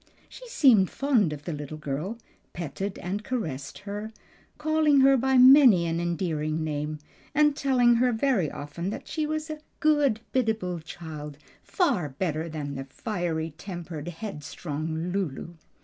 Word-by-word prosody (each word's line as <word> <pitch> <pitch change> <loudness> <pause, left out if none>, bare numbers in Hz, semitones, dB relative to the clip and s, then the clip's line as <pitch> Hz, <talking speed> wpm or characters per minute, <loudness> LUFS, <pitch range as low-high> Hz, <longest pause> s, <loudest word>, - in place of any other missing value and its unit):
She - - -12
seemed 255 - +5
fond 245 - +2
of 145 -1 -7
the 170 - -3
little 150 +1 -6
girl, 155 +9 -4 0.4
petted 175 +4 -4
and 195 +4 -4
caressed 155 - -4
her, 205 +2 -6 0.5
calling 305 -2 +3
her 270 0 +6
by 265 +1 +2
many 255 -8 +8
an 165 0 -1
endearing 160 -3 -1
name, 150 0 -3 0.4
and 295 -1 +4
telling 245 -4 +3
her 250 +1 +3
very 220 - +1
often 150 +7 -5
that 210 - -6
she 310 -2 -2
was 310 0 -3
"a 310 - -6 0.2
good, 295 -7 +3
biddable 220 -8 0
child; 155 -3 -8 0.2
far 245 - 0
better 160 +3 -2
than 145 -3 -5
fiery 165 - -3
tempered, 175 -5 -7
headstrong 160 -2 -5
Lulu." 175 -6 -3
180 Hz, 140 wpm, -27 LUFS, 155-255 Hz, 0.5 s, many